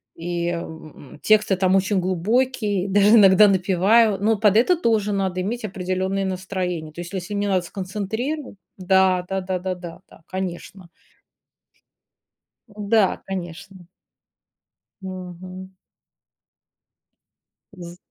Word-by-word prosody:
и, 170 0 -3
м, 160 -4 -8
тексты 215 -2 +3
там 185 0 +2
очень 195 0 +1
глубокие, 205 +2 0
даже 205 +3 +5
иногда 200 0 +7
напеваю, 195 +3 +3
но 220 +1 +2
под 210 0 +3
это 355 +10 +4
тоже 220 - +1
надо 190 -2 -1
иметь 225 +5 -4
определенное 190 0 -2
настроение. 185 -4 -4
То 175 - -7
есть, 175 +3 -9
если 190 +2 -5
мне 205 0 -1
надо 185 -2 +2
сконцентриро 215 - -4 0.2
да 185 -1 +2
да 190 0 -2
да 185 0 -3
да 185 0 -3
да 175 -1 -10
да, - - -18
конечно. 185 -1 -6 1.8
Да, 210 -1 0
конечно. 180 0 -7 1.2
Мгм. 185 0 -9 2.0
З 175 -2 -10
190 Hz, 115 wpm, -22 LUFS, 180-205 Hz, 2.0 s, иногда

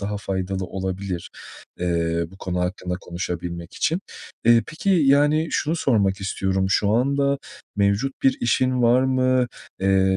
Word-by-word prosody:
daha 105 +1 -3
faydalı 95 -2 -3
olabilir, 95 -1 -4 0.5
eee, 85 -1 0
bu 95 - -14
konu 90 -2 -3
hakkında 90 0 -2
konuşabilmek 85 -1 -5
için. 165 +2 0 0.4
Eee, 115 0 +6
peki, 170 +5 -2
yani, 150 -1 +4
şunu 160 +3 0
sormak 100 -9 +1
istiyorum. 95 0 -1
Şu 100 +1 +2
anda 140 +4 +2 0.4
mevcut 100 +6 +1
bir 135 - +4
işin 130 +1 +1
var 120 +2 +5
mı? 130 -1 +2 0.3
Eee, 95 0 +3
100 Hz, 135 wpm, -23 LUFS, 95-130 Hz, 0.5 s, Eee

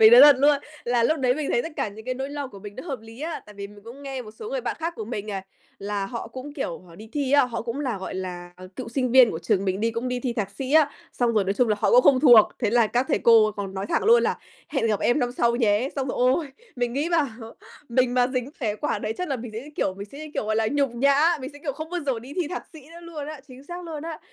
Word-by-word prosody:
Mình 440 +1 +9
nói 485 - +11
thật 290 -2 +9
luôn 285 +1 +5 0.3
là 240 -1 +2
lúc 310 +6 +2
đấy 250 -1 +2
mình 300 -1 -3
thấy 240 - +2
tất 325 - -6
cả - - -1
những 215 +2 -11
cái 255 0 -2
nỗi 270 +2 -4
lo 285 -1 -4
của 200 - -12
mình 205 +1 -10
nó - - -6
hợp 270 -5 -4
lý 225 +4 -13
á. 325 +1 -4
Tại 210 - -13
vì 200 0 -6
mình 205 0 -15
cũng 250 +5 -11
nghe 270 -2 -5
một 215 - -11
số 220 - -9
người - - -1
bạn - - -3
khác 330 +1 -2
của 220 - -5
mình 215 -2 -5
này, 195 -2 -4 0.4
là 200 0 -3
họ 235 +1 -6
cũng 260 +4 -8
kiểu 265 - -3
họ 175 -2 -17
đi 215 +5 -12
thi 280 -2 -1
á, 285 - +6
họ 230 -2 -4
cũng 235 +4 -4
là, 250 -8 -2
gọi 190 - -6
là, 180 -1 -6
ờ, 185 0 -11
cựu 255 - -5
sinh 255 +1 -1
viên 255 -3 +8
của 160 - -4
trường 180 +3 0
mình 190 0 -1
đi, 230 +1 +1
cũng 230 +2 -3
đi 250 0 -2
thi 245 -2 -2
thạc 205 -4 -3
sĩ 260 +7 -5
á, 305 -2 +5 0.2
xong 240 -2 +1
rồi, 210 -3 +2
nói 195 - 0
chung 245 +1 +2
là, 210 - +2
họ - - +3
cũng - - +7
không 260 - +5
thuộc. 240 -7 +8
Thế 220 -4 0
là 235 -1 +4
các 245 +4 +1
thầy - - +2
cô 225 -3 +5
còn 195 -1 -5
nói 195 +1 -3
thẳng - - 0
luôn 470 +2 +6
là - - 0 0.3
hẹn 270 -6 0
gặp 210 -3 0
em 240 +5 +2
năm 245 -2 0
sau 235 -1 +1
nhé. 225 +1 +2
Xong 270 -1 -1
rồi, - - -3
ôi! 255 +5 +2 0.3
Mình 245 -1 -1
nghĩ, 285 +6 -1
bảo, 325 -4 +3 0.6
mình 250 0 +2
mà 245 -1 +4
dính 255 0 -3
phải 215 -4 -1
quả 260 -6 -1
đấy 215 +1 -3
chắc 360 - -2
là 270 - -1
mình 240 -1 -7
sẽ, 220 - -5
như 290 +4 -11
kiểu 185 - 0
mình 200 +2 -8
sẽ, 280 - -9
như 310 0 -8
kiểu, - - -1
gọi 215 0 0
là, 225 - +2
nhục 280 -3 +2
nhã, 280 +6 +3
mình 260 - -6
sẽ, 290 - -12
kiểu, 290 -1 -3
không 315 +4 -7
bao 355 - -2
giờ 255 -4 0
đi 255 +5 -10
thi 345 -5 -1
thạc 360 - -4
sĩ 315 - -11
nữa 340 - -11
luôn 320 -4 -7
á, 305 -2 -7
chính 255 +2 -13
xác 350 +3 -7
luôn 315 -3 -6
á. 325 -1 -6
250 Hz, 320 wpm, -25 LUFS, 215-285 Hz, 0.6 s, nói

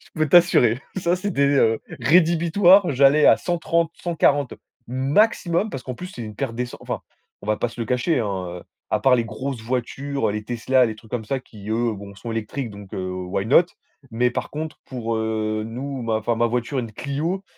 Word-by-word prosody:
Je - - -21
peux 155 -1 0
t'assurer, 140 -8 +5 0.2
ça 175 -1 +1
c'était 185 -6 -1
heu 115 -6 +3 0.2
rédhibitoire, 175 +3 +5
j'allais 140 +3 +5
à - - +7
130, 170 -1 0
140 145 -5 +1 0.4
maximum, 170 - +1
parce 135 - -6
qu'en 125 - -5
plus 180 +9 -8
c'est 125 -10 -8
une 105 -1 -7
perte 120 +1 -3
d'essen 125 0 -4
enfin - - -4 0.4
on - - -12
va 110 0 +1
pas 120 - -1
se 120 - -10
le 115 - -2
cacher 125 +5 +1
hein, 95 -5 -3
heu, - - -14 0.3
à 110 - +2
part 130 +3 +5
les 120 -2 +1
grosses 115 +2 -5
voitures, 130 +3 -2
les 105 0 -3
Tesla, 125 +3 +2
les 110 - -5
trucs 110 0 -17
comme 120 -3 -3
ça, 135 +5 -2
qui 105 -4 -13
eux, 115 +1 +1
bon 100 0 -10
sont 115 - -7
électriques. 115 +3 -4
Donc 100 -1 -12
heu, 95 -1 -3
why 90 +2 -3
not? 145 +9 +6 0.5
Mais 120 +2 +1
par - - -4
contre 155 +1 -6
pour, 115 -3 -3
heu, 110 -1 -1
nous, 130 +3 -5
ma 115 -1 0
enfin 115 +2 0
ma 120 +1 +2
voiture, 120 +3 -2
une 115 -3 -7
Clio, 150 - -3
125 Hz, 205 wpm, -23 LUFS, 110-150 Hz, 0.5 s, à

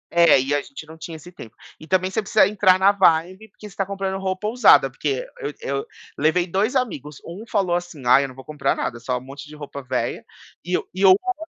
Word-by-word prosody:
é, 170 -5 +6
e 135 +2 -1
a 145 - +1
gente 140 +3 -11
não 160 +1 -13
tinha 160 0 -8
esse 175 +3 -13
tempo. 115 -10 -13 0.2
E 155 - -13
também 185 0 +1
você 220 - -1
precisa 210 +1 +3
entrar 190 -3 +3
na 195 +1 +5
vibe 185 +2 +1
porque 210 - -13
você 195 - -17
tá 195 - 0
comprando 195 0 -4
roupa 190 +2 -3
usada. 245 +3 +5
Porque 475 +4 -3
eu 430 -2 -4
e - - -11
eu 420 - -2 0.3
levei 175 +3 +2
2 200 +8 -1
amigos, 150 - -3
1 185 +6 -8
falou 190 -5 +1
assim: 175 -6 -6
"Ai, 130 +3 +5
eu - - -3
não 130 - -13
vou 130 0 -12
comprar 150 -2 -1
nada, 120 - -4
só 125 +1 -2
um - - -7
monte 140 +3 -11
de 150 - -12
roupa 145 -1 -8
velha". 130 - -3 0.4
E 180 0 0
o - - -7
e 190 +1 +1
o - - +8
outro 370 - +3
180 Hz, 250 wpm, -22 LUFS, 150-200 Hz, 0.4 s, o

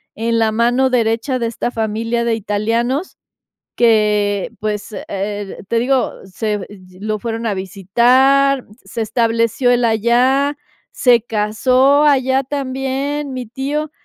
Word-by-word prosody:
en 230 +1 -1
la 220 -1 +2
mano 240 +4 +2
derecha 235 +2 0
de 235 - -1
esta 230 +1 -3
familia 225 +1 -2
de 230 -1 +1
italianos 230 - -2 0.6
que, 210 -2 +2
pues, 210 0 -4
eh, 200 0 -4
te 230 - +1
digo, 260 +2 +1
se 210 +2 -3
ye 185 -2 -15
lo 215 +1 -2
fueron 230 +1 -4
a 210 - 0
visitar, 250 +9 +2 0.2
se - - -6
estableció 230 +2 +1
él 245 0 +2
allá, 245 +6 +2 0.4
se 245 -2 +4
casó 255 +6 +2
allá 265 -2 +3
también, 270 +1 -3
mi 250 -1 -5
tío. 285 +6 -3
235 Hz, 130 wpm, -17 LUFS, 215-265 Hz, 0.6 s, se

